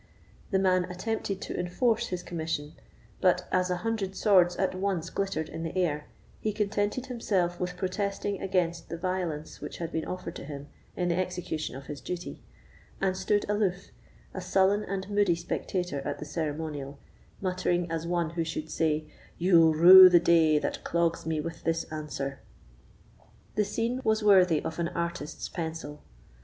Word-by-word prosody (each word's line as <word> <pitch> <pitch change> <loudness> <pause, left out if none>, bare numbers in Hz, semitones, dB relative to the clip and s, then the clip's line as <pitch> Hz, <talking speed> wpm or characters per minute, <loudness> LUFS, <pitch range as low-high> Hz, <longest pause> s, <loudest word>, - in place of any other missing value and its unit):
The 195 - +2
man 185 -1 +3
attempted 195 +2 -3
to - - -5
enforce 225 +6 +1
his 180 -1 -4
commission; 160 -3 -4 0.5
but 180 -1 +3
as 185 0 +2
an 180 - 0
hundred 200 -2 -2
swords 180 -5 +4
at 190 - 0
once 185 -3 -2
glittered 195 -6 -2
in 165 - -7
the 165 +2 -4
air, 150 -5 0 0.3
he 215 - -1
contented 210 +3 -1
himself 195 -9 -1
with 180 0 -3
protesting 200 +1 -2
against 175 -3 -1
the 170 - -4
violence 175 -4 -3
which - - -6
had 165 -1 -4
been 160 - -2
offered 180 -2 -5
to - - -8
him 145 0 -8 0.3
in 180 -1 0
the 170 - +1
execution 180 -6 -3
of 135 +1 -9
his 145 0 -7
duty, 180 -1 -6 0.6
and 190 -1 +1
stood 195 +2 0
aloof, 205 -3 -1 0.4
a 185 - -5
sullen 195 +3 +2
and 190 0 -4
moody 205 -4 +2
spectator 175 -1 -3
of 145 +1 -4
the - - -7
ceremonial, 150 -2 -4 0.4
muttering 180 -2 0
as 165 0 -2
one 170 -2 0
who 170 0 -1
should 155 -1 -5
say: 155 -1 0 0.3
"You'll 165 -3 +5
rue 185 +3 +11
the 175 -1 +6
day 160 -3 +4
that - - -2
clogs 170 -1 0
me 160 -1 0
with 165 +1 -7
this 165 0 0
answer." 140 -3 -4 1.1
The 210 - +1
scene 230 +5 -2
was 220 -1 +1
worthy 185 -6 +5
of 160 - -4
an 170 - +1
artist's 170 -2 -4
pencil. 160 -3 -5
175 Hz, 165 wpm, -28 LUFS, 160-190 Hz, 1.1 s, rue